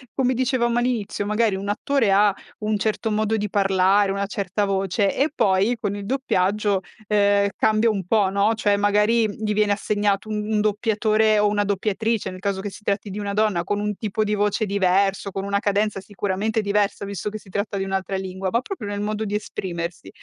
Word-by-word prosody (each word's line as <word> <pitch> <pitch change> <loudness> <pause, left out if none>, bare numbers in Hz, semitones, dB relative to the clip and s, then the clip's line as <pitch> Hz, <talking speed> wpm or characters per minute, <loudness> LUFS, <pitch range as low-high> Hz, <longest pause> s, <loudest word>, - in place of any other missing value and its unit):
come 260 -1 +2
dicevamo 240 -1 +1
all'inizio 230 -4 -1
magari 210 0 +2
un 195 +1 -4
attore 225 +1 +1
ha 200 +1 +4 0.3
un 215 0 0
certo 220 +2 -1
modo 215 +1 +1
di 210 -1 -2
parlare, 195 0 +3
una 200 0 -1
certa 200 0 -2
voce 195 +1 0
e 285 +3 +2
poi 200 +3 +2
con 205 -3 -2
il 200 -1 -6
doppiaggio, 205 -5 +1 0.3
ehm, 200 -1 +3
cambia 220 +1 +3
un 200 -3 -3
po' 205 -2 +3
no, 200 +3 +2
cioè 205 -2 +2
magari 210 +3 +3
gli 210 +1 -3
viene 210 -1 +2
assegnato 205 0 0
un 210 -1 -2
un 215 - +2
doppiatore 215 0 +2
o 210 - +4
una 205 0 +1
doppiatrice 205 +1 -1
nel 185 - -9
caso 195 0 -2
che 205 0 -5
si 210 - -13
tratti 200 0 -2
di 200 - -5
una 200 -1 -3
donna 210 -5 +1
con 205 +3 -2
un 210 0 -2
tipo 215 +2 -2
di 210 0 -1
voce 210 +2 +1
diverso, 195 0 +1
con 195 0 -4
una 200 0 0
cadenza 205 0 0
sicuramente 205 +2 -2
diversa 200 0 0
visto 200 0 -4
che 215 - -6
si 200 - -16
tratta 200 +2 -2
di 195 - -1
un'altra 195 0 -2
lingua 190 0 -4
ma 235 - +2
proprio 255 - -6
nel 205 0 -3
modo 215 +1 -2
di 205 0 -2
esprimersi. 175 -4 -5
205 Hz, 200 wpm, -23 LUFS, 195-215 Hz, 0.3 s, ha